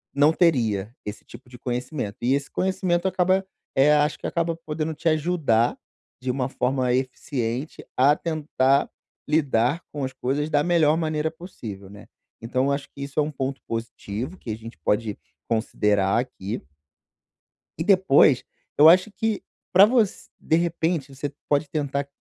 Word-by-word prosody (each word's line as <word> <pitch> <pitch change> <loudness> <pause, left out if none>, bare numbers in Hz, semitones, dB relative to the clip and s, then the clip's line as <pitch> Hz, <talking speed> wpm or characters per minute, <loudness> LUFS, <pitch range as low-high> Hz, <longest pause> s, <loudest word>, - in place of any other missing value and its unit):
não 145 +2 +5
teria 115 - +2
esse 105 0 -7
tipo 125 -1 -14
de 125 - -12
conhecimento. 125 -3 -3
E 125 +3 +2
esse 140 0 -1
conhecimento 185 -1 0
acaba, 190 +1 +2 0.3
eh, 135 +3 +5
acho 150 0 +2
que - - -10
acaba 170 0 -1
podendo 160 -1 -4
te 155 - -3
ajudar, 155 -8 +2 0.4
de 125 0 -1
uma 130 0 -2
forma 130 -1 0
eficiente, 130 0 -3
a 140 +3 +5
tentar 145 -4 +1 0.4
lidar 145 -1 +1
com 145 -2 -3
as 130 - -2
coisas 135 +4 -2
da 145 -1 +2
melhor 160 -3 +3
maneira 155 -1 0
possível, 115 - -9
né. 100 +1 -13 0.3
Então 130 +3 0
eu 140 - +1
acho 140 0 -2
que 140 - -8
isso 140 +2 -3
é 150 - -3
ponto 135 -1 -4
positivo 115 - -5
que 120 - -10
a 110 - -2
gente 115 -2 -11
pode 105 +2 0 0.3
considerar 105 -3 +1
aqui. 120 -4 -4 1.2
E - - -1
depois, 165 - +5 0.3
eu 150 - +8
acho 185 +5 +5
que 220 0 -1 0.3
pra 190 +2 +9
voc 225 -1 +4 0.3
de 160 - +1
repente 165 -4 -1
você 140 +1 -4 0.2
pode 145 0 +1
tentar 140 -2 -2
140 Hz, 155 wpm, -24 LUFS, 125-160 Hz, 1.2 s, pra